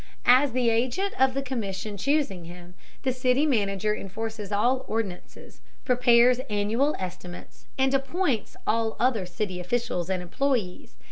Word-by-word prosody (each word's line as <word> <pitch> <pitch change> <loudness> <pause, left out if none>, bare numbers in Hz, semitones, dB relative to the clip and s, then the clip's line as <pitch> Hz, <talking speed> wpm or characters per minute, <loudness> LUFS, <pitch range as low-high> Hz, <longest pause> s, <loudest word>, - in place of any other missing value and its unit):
As 260 +3 +6
the 245 -2 +2
agent 255 +13 0
of 265 -1 +4
the 275 - -1
commission 210 -6 -4
choosing 205 - 0
him, 175 +1 -11 0.3
the 260 - +1
city 255 +3 +2
manager 210 -5 +1
enforces 215 +1 -6
all 245 +6 +1
ordinances, 215 -5 -5 0.2
prepares 245 0 +5
annual 220 +8 +1
estimates, 180 -1 -8
and 265 0 +2
appoints 270 - -1
all 225 0 0
other 230 -7 +1
city 180 +1 -4
officials 185 -2 -2
and 185 -1 -1
employees. 210 - -2
225 Hz, 135 wpm, -26 LUFS, 195-260 Hz, 0.3 s, As